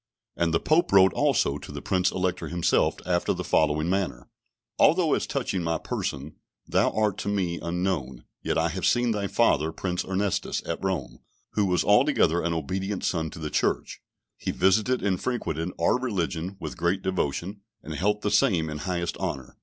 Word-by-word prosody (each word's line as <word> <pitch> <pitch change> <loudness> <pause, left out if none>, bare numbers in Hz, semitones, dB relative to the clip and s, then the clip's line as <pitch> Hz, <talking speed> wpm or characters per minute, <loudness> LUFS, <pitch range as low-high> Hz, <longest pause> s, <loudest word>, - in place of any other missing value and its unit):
And 85 -1 +1
the 80 - +2
Pope 160 +3 +2
wrote 95 -1 +6
also 115 - +1
to - - -10
the - - -6
Prince 90 -1 +1
Elector 90 -1 -2
himself 85 -1 +1
after 85 -1 +1
the - - -4
following 75 +1 +2
manner: 90 -10 -2 0.5
"Although, - - +4
as - - 0
touching 95 - -2
my 80 -1 0
person, 70 0 -4 0.3
thou - - +3
art 105 -3 0
to - - -4
me 90 -4 -1
unknown, 85 -8 -2 0.2
yet - - -1
I 80 +1 +2
have 95 +2 -5
seen 120 -1 +2
thy 100 -2 -1
father, 80 -3 +2
Prince 90 +1 -3
Ernestus, 95 +1 -1
at - - -3
Rome, 95 -8 -2 0.3
who 105 -2 +1
was 90 -2 +2
altogether 85 +2 +3
an 85 - -1
obedient 95 +5 -3
son 80 -3 -1
to - - -11
the 75 -2 -5
Church; - - -1 0.4
he - - -4
visited 105 +7 +2
and 95 -3 0
frequented 85 - -2
our 85 +9 +3
religion 95 -6 -2
with - - -6
great 90 +3 0
devotion, 95 +2 -2 0.2
and 80 - -6
held 105 +6 0
the 105 - 0
same 85 - +2
in 75 - -5
highest 85 +1 -2
honour. 65 -1 -4
90 Hz, 180 wpm, -26 LUFS, 80-100 Hz, 0.5 s, wrote